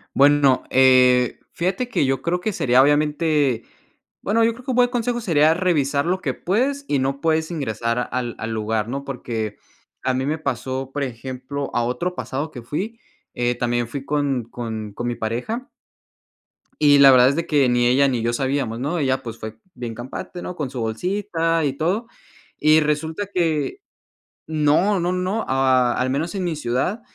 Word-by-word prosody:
Bueno, 140 -2 +4
eh, 125 -2 +4
fíjate 190 +8 -1
que 230 - +1
yo 135 -1 0
creo 175 +4 0
que 215 +4 -2
sería 125 -5 +4
obviamente 145 -3 +2 0.6
Bueno, 225 +3 +2
yo 230 +1 +3
creo 250 +2 -14
que - - -1
un - - -1
buen 245 0 +4
consejo 245 -1 -1
sería 160 -6 +4
revisar 150 -6 +1
lo 185 +2 0
que - - -1
puedes 270 +9 -1
y 140 - +1
no 135 +1 -1
puedes 160 0 +1
ingresar 120 -5 -2
al 120 -2 -3
al 115 - -4
lugar, 110 0 -1
¿no? 140 +2 -4
Porque 115 -5 -4 0.5
a 130 - +1
mí 130 +1 -1
me 150 +3 -1
pasó, 130 -1 -3
por 145 - -1
ejemplo, 130 +2 -5
a 120 - +1
otro 125 +10 -2
pasado 145 +1 -4
que 125 - -8
fui, 200 - -4 0.3
eh, 120 0 0
también 120 0 -1
fui 135 +3 -6
con 140 -5 0
con 110 -3 -5
con 120 +4 -4
mi 120 - -1
pareja. 125 - -4 1.1
Y 145 -1 +6
la 140 -1 +9
verdad 125 0 +6
es 140 - 0
de 165 - -2
que 145 -4 +3
ni 120 0 +3
ella 135 +3 +4
ni 125 -4 0
yo 120 +1 0
sabíamos, 130 -3 -1
¿no?, 145 +7 -1
ella 130 -2 0
pues 115 -1 -7
fue 110 0 -7 0.2
bien 120 -5 -6
campante, 130 +9 -7
no 180 - -6
con 150 -6 -3
su 125 -1 -6
bolsita 165 - -1
y 140 - 0
todo 180 - -1 0.5
y 155 +1 +5
resulta 160 +6 -1
que 165 - 0 0.7
No, 160 +6 +2
no, 175 +1 0
no, 185 +4 -1
a 130 -2 +3
al 130 - -1
menos 160 +7 -2
en 190 - -2
mi 170 -3 -1
ciudad, 145 - -1
140 Hz, 185 wpm, -22 LUFS, 125-170 Hz, 1.1 s, la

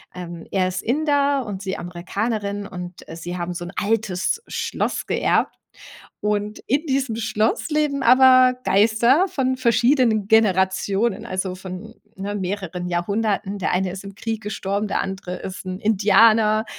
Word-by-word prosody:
ähm, 175 -2 -8
er 185 -2 +1
ist 185 - -3
Inder 285 0 +1
und 200 -2 -6
sie 190 -1 -3
Amerikanerin 200 +4 -3
und, 180 -1 -9
äh, 165 - -8
sie 175 +2 -6
haben 175 0 -3
so 175 0 -6
'n 175 - -7
altes 210 - -1
Schloss - - -2
geerbt. - - +1 0.7
Und 210 0 -1
in 285 +6 +1
diesem 265 -5 -1
Schloss 225 +5 0
leben 295 -3 0
aber 255 0 +6
Geister 235 - +4
von 260 -1 0
verschiedenen 235 -3 +2
Generationen, 200 +1 +2
also, 185 -3 -3
von, 190 +4 -9 0.2
ne, 200 +2 -4
mehreren 185 -2 -4
Jahrhunderten. 200 +3 -1
Der - - 0
eine 180 0 0
ist 195 +1 -8
im 195 0 -9
Krieg 225 0 -4
gestorben, 205 0 -2
der - - 0
andere 190 -1 -5
ist 190 0 -7
'n 185 +1 -5
Indianer, 215 +1 +4
205 Hz, 150 wpm, -22 LUFS, 190-230 Hz, 0.7 s, aber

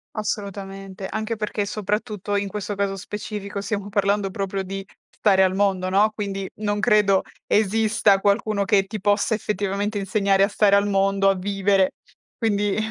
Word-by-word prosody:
Assolutamente. 195 -2 -5
Anche 220 +1 -3
perché, 210 -1 -2
soprattutto 210 -1 -3
in 200 0 0
questo 205 0 -4
caso 195 0 -1
specifico, 200 0 -6
stiamo 205 -1 -3
parlando 200 0 +1
proprio 195 0 -3
di 195 +1 -5 0.3
stare 190 -3 +3
al 185 - +2
mondo, 195 -2 +1
no, 205 +3 +3
quindi 195 -2 -4
non 205 -1 -2
credo 210 -3 +3 0.2
esista 215 -1 +3
qualcuno 205 0 +1
che 195 0 +3
ti 215 +1 -6
possa 205 +3 +1
effettivamente 205 0 -2
insegnare 195 0 +2
a - - +4
stare 200 -1 +3
al 200 0 +3
mondo, 195 0 +2
a 195 - +2
vivere. 195 0 +1 0.5
Quindi 205 -3 0
200 Hz, 155 wpm, -23 LUFS, 195-210 Hz, 0.5 s, a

